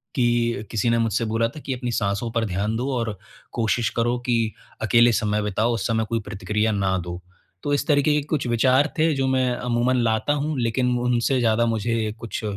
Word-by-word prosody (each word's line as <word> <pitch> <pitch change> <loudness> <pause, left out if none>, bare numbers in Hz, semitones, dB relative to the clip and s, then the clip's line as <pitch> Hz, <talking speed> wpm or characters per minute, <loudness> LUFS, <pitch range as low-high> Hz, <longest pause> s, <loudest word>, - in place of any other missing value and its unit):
कि 120 -4 +1
किसी 115 +2 +1
ने 115 - +3
मुझसे 115 +1 0
बोला 115 +1 +1
था 155 - -10
कि 135 - -1
अपनी 125 -1 -3
साँसों 105 0 -1
पर 115 -1 0
ध्यान 100 +2 -2
दो 130 +4 -2
और 115 -4 -3 0.4
कोशिश 115 0 0
करो 120 +1 +1
कि 115 -2 +1 0.3
अकेले 115 +2 +5
समय 105 -1 0
बिताओ, 105 +3 0
उस 115 - -1
समय 110 -1 0
कोई 115 - 0
प्रतिक्रिया 105 +2 -1
ना 95 -2 0
दो। 90 0 -6 0.4
तो 145 - 0
इस 145 - 0
तरीक़े 145 0 +3
के 150 - +2
कुछ 145 -4 -1
विचार 130 +5 +3
थे, 160 0 +3
जो 135 -1 0
मैं 130 -1 +2
अमूमन 120 +1 0
लाता 110 +5 +1
हूँ, 150 -1 -2
लेकिन 125 +1 +1
उनसे 125 +2 +1
ज़्यादा 115 -1 +2
मुझे 115 -1 -1
कुछ, 115 -1 -5
115 Hz, 200 wpm, -23 LUFS, 110-125 Hz, 0.4 s, अकेले